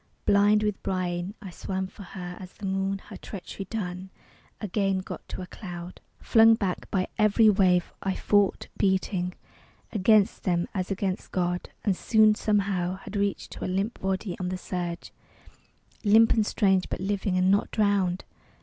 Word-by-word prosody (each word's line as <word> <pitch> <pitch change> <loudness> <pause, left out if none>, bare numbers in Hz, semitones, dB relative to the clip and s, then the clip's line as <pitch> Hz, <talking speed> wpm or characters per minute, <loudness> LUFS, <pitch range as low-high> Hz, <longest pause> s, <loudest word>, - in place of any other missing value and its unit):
Blind 205 +1 +4
with 210 -2 -1
brine 180 +1 -2
I 190 - -7
swam 190 +2 -3
for 190 - -12
her 180 -2 -7
as 185 -1 -10
the 200 - -9
moon, 195 +1 -1
Her - - -8
treachery 195 0 -8
done, 190 -4 -4 0.5
again 195 -1 0
got 185 - -7
to 185 - -5
a - - -6
cloud. 175 -2 -9 0.2
Flung 225 0 +6
back 195 -5 -3
by 185 -2 0
every 215 +1 +5
wave, 180 -3 +2
I 190 -1 -1
fought; 205 -2 +2
beating 190 -2 0 0.6
Against 210 +1 +3
them 175 -2 0
as 185 -2 -2
against 195 -1 -2
God. 180 -1 -1 0.2
And 200 -3 +2
soon, 215 +2 +4
somehow, 195 -4 0
Had 195 - -10
reached 200 -1 -1
to - - -7
a - - -1
limp 195 +5 -1
body 190 -1 -2
on 180 -1 -2
the 185 - -3
surge, 175 -2 -5 0.9
Limp 220 +2 +6
and 215 -2 +1
strange 190 -4 +2
but - - -3
living... 195 0 -1
and 185 +1 +3
not 200 - +2
drowned! 200 -4 +1
190 Hz, 165 wpm, -27 LUFS, 185-205 Hz, 0.9 s, Flung